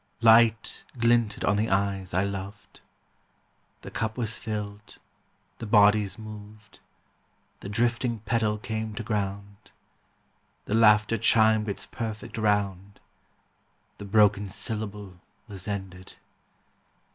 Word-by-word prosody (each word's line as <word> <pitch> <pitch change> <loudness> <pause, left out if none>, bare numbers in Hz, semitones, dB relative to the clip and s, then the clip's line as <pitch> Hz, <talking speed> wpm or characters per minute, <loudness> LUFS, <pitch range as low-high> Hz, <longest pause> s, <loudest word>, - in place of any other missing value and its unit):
Light 115 -1 +4
glinted 115 -2 +1
on 100 - +2
the 110 +2 0
eyes 95 -1 -1
I 95 +2 +1
loved. 100 +1 -7 1.0
The - - -10
cup 110 +1 -3
was 115 -3 -2
filled. 105 -1 -6 0.6
The 115 - -6
bodies 105 -2 +4
moved. 105 -1 -12 0.8
The - - -8
drifting 120 +2 0
petal 110 -2 0
came 110 0 -5
to 115 - -5
ground. 100 -1 -5 1.0
The - - -4
laughter 105 0 +4
chimed 110 -1 +3
its 100 - -5
perfect 115 0 -6
round. 100 -2 -1 1.0
The 100 - -7
broken 100 -1 +3
syllable 105 -3 -1 0.3
was 100 -2 -7
ended. 95 -2 -6
105 Hz, 110 wpm, -26 LUFS, 100-110 Hz, 1.0 s, Light